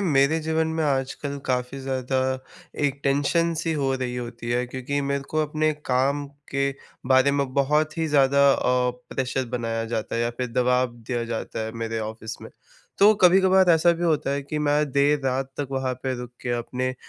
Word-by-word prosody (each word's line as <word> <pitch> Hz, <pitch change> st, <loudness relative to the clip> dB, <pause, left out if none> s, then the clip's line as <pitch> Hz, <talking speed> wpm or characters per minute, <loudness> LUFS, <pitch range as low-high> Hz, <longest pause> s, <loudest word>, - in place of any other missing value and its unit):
मेरे 155 Hz, -3 st, +3 dB
जीवन 160 Hz, +1 st, 0 dB
में 160 Hz, -, 0 dB
आजकल 140 Hz, +1 st, -2 dB
काफ़ी 125 Hz, +1 st, -1 dB
ज़्यादा 130 Hz, 0 st, -2 dB, 0.7 s
एक 140 Hz, 0 st, -3 dB
टेंशन 145 Hz, +5 st, +2 dB
सी 165 Hz, 0 st, -1 dB
हो 140 Hz, -3 st, 0 dB
रही 125 Hz, -1 st, -3 dB
होती 120 Hz, -1 st, -6 dB
है, 125 Hz, +1 st, 0 dB
क्योंकि 130 Hz, +3 st, -3 dB
मेरे 140 Hz, 0 st, -1 dB
को 155 Hz, -, -1 dB
अपने 155 Hz, +1 st, 0 dB
काम 140 Hz, +3 st, +1 dB, 0.2 s
के 140 Hz, 0 st, +1 dB, 0.4 s
बारे 130 Hz, +1 st, +5 dB
में 140 Hz, -2 st, -1 dB
बहुत 150 Hz, +3 st, +1 dB
ही 160 Hz, -, +1 dB
ज़्यादा 140 Hz, -1 st, +4 dB
अ, 125 Hz, -1 st, +1 dB, 0.2 s
प्रेशर 130 Hz, 0 st, -1 dB
बनाया 115 Hz, -1 st, -2 dB
जाता 110 Hz, -1 st, -3 dB
है -, -, 0 dB
या 120 Hz, -, 0 dB
फिर 125 Hz, -, -1 dB
दबाव 125 Hz, 0 st, +2 dB
दिया 120 Hz, +1 st, -4 dB
जाता 115 Hz, -1 st, -4 dB
है 110 Hz, -, -5 dB
मेरे 115 Hz, 0 st, -2 dB
ऑफ़िस 110 Hz, +1 st, -6 dB
में। -, -, -9 dB, 0.5 s
तो 205 Hz, +2 st, +7 dB
कभी-कभार 190 Hz, 0 st, +5 dB
ऐसा 165 Hz, +1 st, +5 dB
भी 170 Hz, +1 st, -3 dB
होता 155 Hz, -4 st, +1 dB
है 140 Hz, 0 st, -1 dB
कि 150 Hz, +2 st, -4 dB
मैं 150 Hz, 0 st, +1 dB
देर 145 Hz, +1 st, +3 dB
रात 130 Hz, +1 st, -1 dB
तक 145 Hz, -2 st, -3 dB
वहाँ 130 Hz, -1 st, -1 dB
पे 130 Hz, -1 st, -1 dB
रुक 125 Hz, -1 st, -7 dB
के 120 Hz, -, -3 dB
अपने 130 Hz, +2 st, -3 dB
135 Hz, 190 wpm, -24 LUFS, 125-150 Hz, 0.7 s, तो